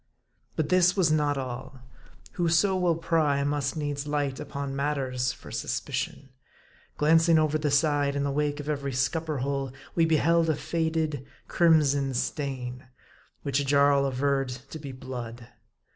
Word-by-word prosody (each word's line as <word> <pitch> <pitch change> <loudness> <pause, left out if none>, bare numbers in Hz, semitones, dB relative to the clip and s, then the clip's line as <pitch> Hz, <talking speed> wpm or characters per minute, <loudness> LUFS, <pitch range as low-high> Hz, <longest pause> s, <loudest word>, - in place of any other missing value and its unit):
But 155 -2 -1
this 180 +1 +4
was 170 -5 +3
not 150 -2 +2
all. 130 0 -6 0.5
Whoso 175 +3 +2
will 180 -2 +2
pry, 155 -4 +1
must 145 +1 -1
needs 145 -1 -3
light 145 -2 -1
upon 140 -1 -5
matters 135 -3 -1
for - - -12
suspicion. 135 - -3 0.7
Glancing 165 +2 +4
over 155 0 +2
the 150 -1 0
side, 145 -1 +2
in 140 - 0
the 140 - 0
wake 145 +1 -1
of 145 - -6
every 140 -2 -2
scupper 155 +4 -1
hole, 140 -2 -2 0.2
we 165 - +3
beheld 165 +1 +3
a 155 - +2
faded, 160 -4 -1 0.2
crimson 145 -6 +3
stain, 130 -2 -3 0.6
which 140 0 0
Jarl 140 0 +4
averred 135 0 0 0.2
to 160 - -6
be 140 -2 -7
blood. 120 -2 -8
145 Hz, 145 wpm, -27 LUFS, 135-160 Hz, 0.7 s, this